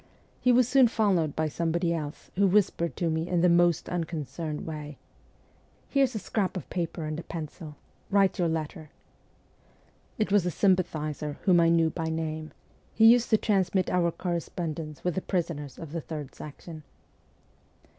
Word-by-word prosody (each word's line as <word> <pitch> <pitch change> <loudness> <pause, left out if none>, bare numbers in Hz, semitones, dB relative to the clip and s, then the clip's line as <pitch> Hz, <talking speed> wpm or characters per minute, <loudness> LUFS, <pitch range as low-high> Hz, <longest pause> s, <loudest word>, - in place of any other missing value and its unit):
He 250 - +3
was 245 -1 +5
soon 260 -1 +6
followed 190 -10 +1
by 160 0 0
somebody 170 +2 0
else, 150 -2 -6
who 200 +2 +4
whispered 185 -3 +1
to 170 - -1
me 160 +1 -1
in 175 -2 +1
the 180 - +5
most 175 -1 +3
unconcerned 160 -2 -4
way, 150 -2 -6 0.9
'Here's 270 -4 +2
a - - 0
scrap 200 -2 -2
of 170 - -7
paper 170 -2 -3
and 155 +1 -3
a - - -6
pencil: 155 -1 -7 0.3
write 195 -2 +3
your 175 - +2
letter.' 155 -1 -4 1.3
It 215 -3 0
was 205 -3 +4
a 180 - 0
sympathizer, 155 -5 0
whom 180 -3 +5
I 165 0 +5
knew 165 -1 +3
by 165 0 -3
name; 155 -1 -3 0.4
he 220 - +5
used 235 +1 +6
to 220 - +5
transmit 195 -3 +1
our 175 -1 +2
correspondence 165 -3 -4
with 180 - 0
the 190 - -2
prisoners 165 -8 -3
of 160 -3 -8
the 165 0 -3
Third 150 -3 -7
Section. 155 +2 -10
170 Hz, 165 wpm, -28 LUFS, 155-190 Hz, 1.3 s, soon